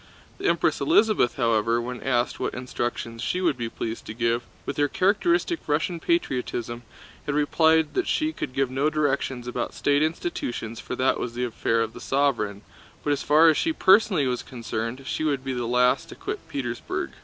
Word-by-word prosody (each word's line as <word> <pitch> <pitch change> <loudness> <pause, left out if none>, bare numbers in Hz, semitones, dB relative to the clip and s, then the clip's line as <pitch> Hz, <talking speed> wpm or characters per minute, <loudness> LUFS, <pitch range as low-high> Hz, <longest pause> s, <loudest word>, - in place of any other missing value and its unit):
The - - -1
Empress - - +2
Elisabeth, 220 - +3
however, 115 -1 +2
when 125 +1 -5
asked 125 -2 0
what - - -2
instructions 120 -2 -4
she 180 - -1
would 170 -6 +2
be 120 -2 -4
pleased 115 0 -5
to 110 - -6
give—with 115 +1 -2
her 145 0 +3
characteristic 335 - +1
Russian 160 +3 0
patriotism 125 - -1 0.5
had 145 - 0
replied 160 +1 +3
that 380 - 0
she 310 0 0
could 130 - -5
give 135 -1 0
no 135 +3 +1
directions 140 -5 -1
about 125 -1 -3
state 145 0 +2
institutions 140 -8 -2
for - - -5
that 130 +1 +1
was 120 -1 -4
the 125 - -2
affair 115 -1 0
of 115 0 -2
the - - -10
sovereign, 120 -8 0 0.4
but 145 - +2
as 145 - -2
far 155 +3 +5
as 160 - +5
she 325 - +1
personally 190 - +4
was 125 -1 -1
concerned 115 +1 -5
she 155 - -2
would 140 -4 0
be 135 - -2
the 120 -2 -2
last 125 +1 +2
to - - -9
quit - - -6
Petersburg. 120 -4 -3
130 Hz, 185 wpm, -25 LUFS, 120-155 Hz, 0.5 s, far